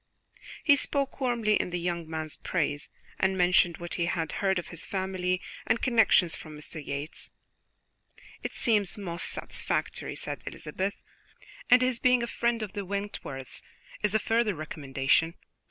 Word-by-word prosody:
He 285 -3 +7
spoke 280 0 0
warmly 235 -4 +2
in - - -4
the 175 0 -2
young 170 -2 -2
man's 160 -1 -3
praise, 150 -4 -1 0.3
and 190 0 +2
mentioned 175 -1 +4
what 175 0 -6
he 170 -1 0
had 165 -4 -1
heard 190 -1 +1
of 175 - -4
his 170 - -4
family 185 -1 -1 0.3
and 225 +1 +3
connections 225 -8 +4
from 155 -1 -9
Mr. 155 0 -6
Yates. 145 +3 -4 1.1
"It - - -4
seems 210 -6 +3
most 175 -3 -2
satisfactory," - - -1
said - - -4
Elizabeth, 195 +2 -3 0.7
"and 250 0 +7
his 255 -2 +1
being 250 -1 +4
a - - +1
friend 235 -1 0
of 205 - -6
the 200 - -3
Wentworths 190 -9 -4 0.4
is 210 0 +2
a - - +8
further 225 -1 +1
recommendation. 150 +1 +1
185 Hz, 155 wpm, -29 LUFS, 165-220 Hz, 1.1 s, a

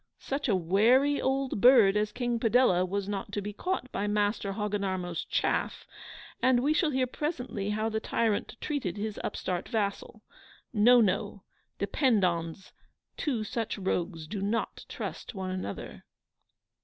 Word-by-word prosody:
Such 275 -1 -3
a 200 - +4
WARY 230 - +3
old 265 -5 -1
BIRD 235 -6 +7
as 210 0 +1
King 240 0 -1
Padella 225 -6 +4
was 200 +1 -2
not 205 0 -4
to 205 - -1
be 205 +1 -5
caught 360 - -3
by 205 - -2
Master 205 -1 0
Hogginarmo's 195 -5 -2
CHAFF - - -1 0.6
and 255 -1 +4
we 290 +4 +2
shall 310 0 +2
hear 260 -2 +1
presently 250 - -3
how 215 +1 0
the 220 -1 -1
tyrant 220 -1 -1
treated 275 - -3
his 210 0 -4
upstart 180 -1 -3
vassal. 215 0 -3 0.5
No, 240 +3 +6
no; 200 -1 0 0.3
depend 240 -8 +2
on's, 170 +1 -2 0.4
two 250 -8 -1
such 225 +1 -3
rogues 175 -4 -2
do 195 +5 -5
not 210 +3 -2
trust - - -6
one 190 -1 -3
another. 185 - -6
210 Hz, 145 wpm, -29 LUFS, 195-245 Hz, 0.6 s, BIRD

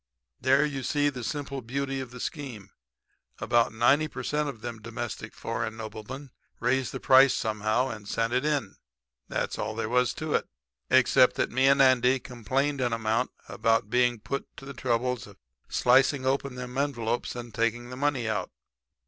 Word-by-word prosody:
"There 135 +3 +4
you 140 -2 -3
see 145 +3 +1
the 125 -4 -6
simple 140 +1 -4
beauty 135 +3 -3
of 130 -2 -5
the 125 +1 -10
scheme. 120 - -6 0.7
About 120 -1 +2
90 135 +7 +3
per 125 -4 -7
cent. 150 +2 0
of 115 -6 -8
them 115 -2 -6
domestic 115 0 -6
foreign 110 - -3
noblemen 115 +5 -8 0.3
raised 130 +1 +1
the 135 - -5
price 130 0 +6
somehow 110 +3 0
and 105 -2 -8
sent 115 +2 -1
it 125 - +2
in. 145 -10 -1 0.5
That - - -1
was - - -6
all 110 - -3
there 115 -1 -2
was 125 +1 +2
to 155 -2 -3
it. - - +1 0.4
Except 130 0 +5
that - - 0
me 130 +2 +3
and 140 0 +6
Andy 130 0 +4
complained 130 +4 -2
an 120 -2 +1
amount 115 +2 0 0.2
about 115 -1 +1
being 125 -1 +3
put 140 +6 -4
to 135 - -10
the 140 - -7
trouble 125 0 0
of 125 - -10 0.3
slicing 130 +2 +3
open 135 0 0
them 125 +1 -5
envelopes, 120 -5 -1
and 120 -1 -7
taking 120 +2 -1
the - - -6
money 135 -3 0
out. 105 -4 -1
125 Hz, 180 wpm, -27 LUFS, 115-135 Hz, 0.7 s, price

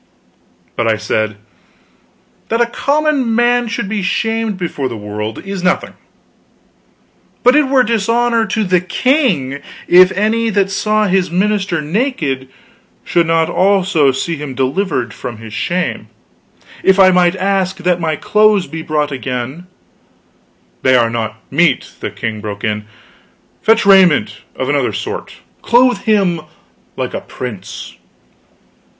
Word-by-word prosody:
But 120 - 0
I 110 -1 +2
said: 110 0 -1 1.1
"That 230 - 0
a 240 - +4
common 280 -1 0
man 240 0 +2
should 225 -3 -3
be 210 0 -2
shamed 225 +3 -1
before 155 -7 -3
the 115 - -6
world, 105 +1 -5
is 195 -1 -4
nothing; 185 +1 0 1.5
but 250 +2 +5
it 300 -2 +4
were 265 -1 +4
dishonor 230 +1 +1
to 215 +2 -1
the 180 -2 +2
king 185 - 0 0.3
if 180 +1 +7
any 220 +3 +1
that 200 -2 +1
saw 215 +2 +1
his 190 -2 +1
minister 190 -2 0
naked 150 - -2 0.6
should 170 -1 +1
not 165 -1 +2
also 185 -7 +2
see 160 +5 -3
him 145 -3 -6
delivered 130 - -1
from 120 - -7
his 110 -1 -10
shame. 180 +10 -2 0.7
If 190 +1 +3
I 190 -1 +7
might 180 0 +3
ask 190 0 0
that 180 -1 0
my 160 -2 -1
clothes 210 +3 +3
be 160 0 -7
brought 150 -2 -1
again 130 +5 -5 0.5
" - - -38
"They 130 0 +4
are 115 -2 +3
not 110 -2 -3 0.2
meet," 165 +4 +2
the - - -4
king 110 -2 -5
broke 105 -1 -6
in. 105 -1 -2 0.8
"Fetch 225 -1 +3
raiment 195 -2 +4
of - - -3
another - - 0
sort; - - -5 0.3
clothe 245 +1 +3
him 195 -7 +1 0.6
like - - -3
a - - -4
prince!" 105 -7 -8
185 Hz, 140 wpm, -16 LUFS, 135-215 Hz, 1.5 s, if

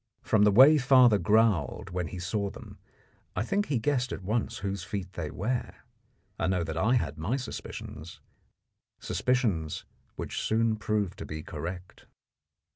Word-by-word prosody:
From 105 -2 +3
the 105 - +5
way 135 +8 +8
father 125 -5 +6
growled 105 - +2
when 90 -1 -2
he 90 - -7
saw 100 +3 -2
them, - - -12 0.6
I - - 0
think 200 - 0
he 140 - +1
guessed 125 +2 0
at - - -5
once 110 +4 -1
whose 100 -2 -3
feet 95 -3 -5
they 80 -3 -4
were. 120 +9 -3 0.6
I - - +1
know 90 -2 +1
that 80 -1 -4
I 110 +10 +2
had 80 - -1
my 105 +12 -1
suspicions 85 - -7 0.8
suspicions 105 - -1 0.3
which - - -4
soon 115 0 +1
proved 105 -3 -1
to - - -5
be 75 0 -6
correct. 90 +3 -7
105 Hz, 155 wpm, -28 LUFS, 90-120 Hz, 0.8 s, way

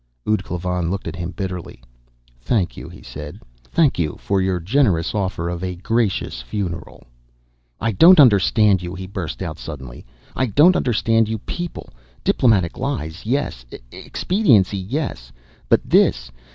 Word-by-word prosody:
Ud 105 -3 +1
Klavan 90 -1 -2
looked 100 +2 -4
at - - -5
him 85 0 -4
bitterly. 90 -1 -6 0.6
"Thank 90 - 0
you," - - -9
he - - -13
said. 75 0 -9 0.2
"Thank 140 - +1
you 75 -3 -1
for 100 -1 0
your 95 -1 0
generous 95 - +1
offer 95 -5 -2
of 85 +1 -4
a 90 -1 -3
gracious 100 - -1
funeral. 85 - -5 0.8
"I 115 - 0
don't 170 - +7
understand 100 - +5
you!" 90 +1 -6
he 95 +1 -6
burst 95 -2 -5
out 80 -3 -6
suddenly. 65 -6 -8 0.3
"I 130 - +1
don't 150 - +5
understand 115 -4 +2
you 110 - -1
people! 175 - -6 0.3
Diplomatic 100 -9 +2
lies, 105 - -4
yes. 125 - -1 0.5
Expediency, 115 - +2
yes! 95 - -4 0.4
But - - +3
this - - +3
95 Hz, 145 wpm, -21 LUFS, 85-115 Hz, 0.8 s, don't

